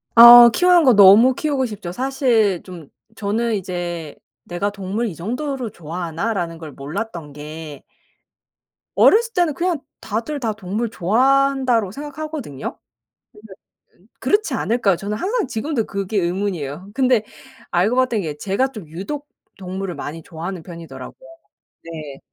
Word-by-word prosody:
어 235 +1 +11
키우는 355 +5 +4
거 255 - +6
너무 205 +6 +7
키우고 285 -5 -1
싶죠. 205 -5 -7
사실 235 - +1
좀 175 -6 -11 0.3
저는 220 +3 -1
이제 175 -4 -5 0.3
'내가 190 +4 -2
동물 200 +4 -3
이 180 - -6
정도로 250 - -4
좋아하나?'라는 170 +2 -4
걸 160 -3 -9
몰랐던 160 +2 -6
게 150 0 -9 1.1
어렸을 460 +1 +4
때는 345 -4 +1
그냥 340 +2 -1 0.2
다들 230 +8 -3
다 225 -4 -1
'동물 215 +3 -3
좋아한다.'로 255 +1 +2
생각하거든요. 290 - -6 0.5
근데 210 -1 -14 0.7
그렇지 410 +1 +1
않을까요? 220 -7 +1
저는 205 +3 -4
항상 415 - -1
지금도 235 0 -2
그게 200 +1 -3
의문이에요. 180 -2 -3
근데 255 -5 +2 0.5
알고 195 +8 +1
봤던 245 -5 +1
게 150 -3 -5
제가 200 - 0
좀 200 -8 -10
유독 200 - -6 0.3
동물을 190 -1 -5
많이 160 +3 -7
좋아하는 170 +2 -7
편이더라고요. 145 -7 -11 0.6
네. 155 -4 -8
205 Hz, 300 characters per minute, -20 LUFS, 175-255 Hz, 1.1 s, 어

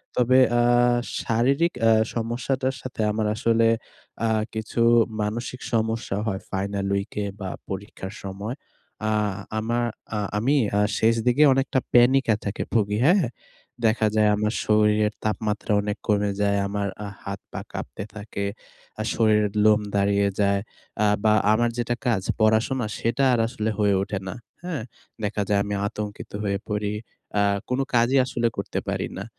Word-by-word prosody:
তবে 125 +1 +4 0.2
আ - - +5 0.6
শারীরিক 135 +9 +2
অ্যা 115 0 +5 0.2
সমস্যাটার 125 +3 -1
সাথে 125 -3 -5
আমার 110 0 -1
আসলে 115 0 +2 0.6
আ - - +1 0.2
কিছু 110 +2 -3 0.4
মানসিক 115 +4 -3
সমস্যা 110 -2 0
হয়। 95 -2 -1
ফাইনাল 100 0 -2
উইক 100 0 -3
এ - - -2
বা 95 - -4 0.2
পরীক্ষার 95 0 -6
সময়। 100 +5 -5 0.5
আ - - +1 0.5
আমা 120 +2 -1 0.4
আ - - 0 0.2
আমি 130 +8 +2 0.2
আ - - +3 0.2
শেষ 115 +1 +4
দিকে 135 +5 +5
অনেকটা 135 0 +1
প্যানিক 130 +2 +5
এ - - +2
থাকে 100 +1 -2
ভুগি 105 -2 +2
হ্যাঁ? 180 +3 +5 0.6
দেখা 110 0 +3
যায় 105 -1 +4
আমার 105 +2 0
শরীরের 105 0 +3
তাপমাত্রা 105 0 -1
অনেক 105 +1 -3
কমে 105 -2 +2
যায়। 100 0 +2
আমার 100 0 -2 0.2
আহ 100 - -7
হাত 100 0 -5
পা - - -5
কাঁপতে - - -5
থাকে। 100 -1 -5 0.6
আ - - -1
শরীরের 105 -2 +2
লোম 105 0 +5
দাঁড়িয়ে 100 0 +3
যায়। 100 -1 +3 0.4
আ - - +4 0.2
বা 110 -1 +5 0.2
আমার 120 +2 +2
যেটা 120 0 0
কাজ 105 -6 +1 0.2
পড়াশোনা 110 +3 +2
সেটা 115 +4 0
আর 120 - +2
আসলে 110 -2 -2
হয়ে 100 -1 +3
ওঠে 100 0 -3
না। - - -4 0.3
হ্যাঁ? 165 -10 -3 0.4
দেখা 105 0 -1
যায় 100 -1 +2
আমি 105 0 -3
আতঙ্কিত 105 0 -6
হয়ে 100 -1 -1
পড়ি। 105 -1 -1 0.5
আ - - +4 0.3
কোনো 130 +2 +1
কাজই 120 +3 +4
আসলে 120 -2 0
করতে - - -2
পারি - - -1
না। 100 - -5
110 Hz, 155 wpm, -24 LUFS, 100-120 Hz, 0.6 s, আ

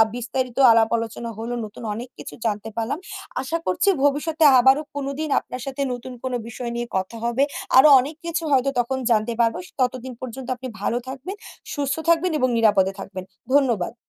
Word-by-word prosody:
বিস্তারিত 250 +1 -3
আলাপ 225 0 +4
আলোচনা 230 +1 -5
হলো। 230 +2 -4
নতুন 210 +3 -11
অনেক 240 +3 -6
কিছু - - -8
জানতে 210 0 -1
পারলাম। 230 +7 -2 0.4
আশা 320 +6 -2
করছি 185 - +2
ভবিষ্যতে 305 +3 +1 0.2
আবারও 265 +4 +5
কোনোদিন 285 +2 -3
আপনার 250 - -8
সাথে 275 +1 -4
নতুন 245 +1 -7
কোনো 255 -1 -1
বিষয় 235 +1 -5
নিয়ে 240 0 -3
কথা 190 +5 -4
হবে। 240 +4 +2 0.3
আরও 280 +4 +9
অনেক 285 +5 -3
কিছু 335 0 -2
হয়তো 270 0 +3
তখন 250 +2 0
জানতে 220 +1 +2
পারবো। 230 -1 +2
স - - -15
ততদিন 255 0 -1
পর্যন্ত 255 0 -7
আপনি 255 +1 -7
ভালো 230 - 0
থাকবেন, 270 +9 -6 0.4
সুস্থ 280 -2 -1
থাকবেন 335 +1 +3
এবং 255 - +2
নিরাপদে 195 -4 +3
থাকবেন। 190 -1 -7 0.3
ধন্যবাদ। 240 -9 +2
250 Hz, 175 wpm, -23 LUFS, 230-275 Hz, 0.4 s, আরও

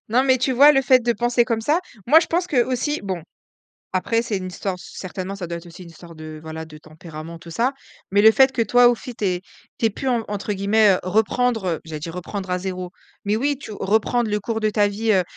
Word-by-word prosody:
Non 245 +4 +3
mais 260 -1 +3
tu 260 +1 0
vois? 285 +4 +7
Le 270 -1 +3
fait 255 0 +5
de 240 0 +1
penser 240 +2 +1
comme 230 -2 -1
ça 295 +8 +2 0.3
moi 315 +5 +7
je 330 - -3
pense 350 +2 0
que 255 -7 +2
aussi 260 +4 -2
bon, 185 -4 -4 0.7
après 230 +5 0
c'est 220 -4 -2
une 185 -1 -4
histoire 185 0 -4
c - - -12
certainement 185 +1 -5
ça 180 -3 -5
doit 170 0 -5
être 170 - -14
aussi 170 +2 -12
une 170 - -12
histoire 165 +1 -13
de 155 -1 -9
voilà 160 0 -7
de 155 -1 -13
tempérament 155 +1 -10
tout 170 - -12
ça. 240 +10 0 0.4
Mais 200 +1 +3
le 220 - +9
fait 265 +1 +5
que 235 - +1
toi 245 +3 +5
aussi 240 +1 -2
tu 215 - -5
ais 180 -2 0 0.4
tu 225 - +2
ais - - +2
pu 265 +6 -4
en 235 -3 0
entre 205 0 -3
guillemets, 205 +2 +3
heu, - - -1
reprendre, 220 +4 +1
heu, 165 - -2
j'allais 155 -2 -7
dire 165 +2 -6
reprendre 190 +2 -6
à 180 - 0
0, 185 -1 -5 0.3
mais 205 +2 +1
oui 280 +3 0
tu 220 - -9
reprendre 220 +3 0
le 210 - 0
cours 225 +2 -3
de 215 0 +1
ta 205 -1 +2
vie. 215 +2 0
Heu, 185 -2 +4
210 Hz, 260 wpm, -22 LUFS, 180-240 Hz, 0.7 s, le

